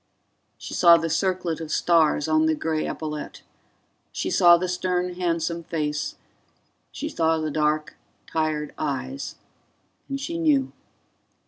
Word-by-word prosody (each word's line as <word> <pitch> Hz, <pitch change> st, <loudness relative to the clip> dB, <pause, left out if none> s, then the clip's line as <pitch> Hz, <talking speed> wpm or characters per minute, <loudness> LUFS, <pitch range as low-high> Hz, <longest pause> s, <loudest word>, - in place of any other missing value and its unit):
She -, -, -8 dB
saw 170 Hz, -1 st, +7 dB
the 165 Hz, -1 st, -2 dB
circlet 180 Hz, -2 st, -1 dB
of 155 Hz, -1 st, -6 dB
stars 160 Hz, -3 st, +3 dB
on 155 Hz, 0 st, +3 dB
the 160 Hz, -, +2 dB
gray 155 Hz, 0 st, -2 dB
epaulet; 150 Hz, -1 st, -6 dB, 0.7 s
she -, -, -3 dB
saw 175 Hz, -1 st, +7 dB
the 185 Hz, +2 st, -2 dB
stern 180 Hz, 0 st, -1 dB
handsome 170 Hz, -1 st, -1 dB
face; 150 Hz, -3 st, -3 dB, 0.8 s
she 300 Hz, -, -5 dB
saw 160 Hz, -, +1 dB
the 155 Hz, -1 st, -2 dB
dark 150 Hz, 0 st, 0 dB, 0.3 s
tired 155 Hz, -2 st, -2 dB
eyes. 155 Hz, -, -3 dB, 0.7 s
And 275 Hz, 0 st, -3 dB
she 335 Hz, +5 st, -4 dB
knew. 290 Hz, -5 st, +2 dB
165 Hz, 130 wpm, -24 LUFS, 155-180 Hz, 0.8 s, saw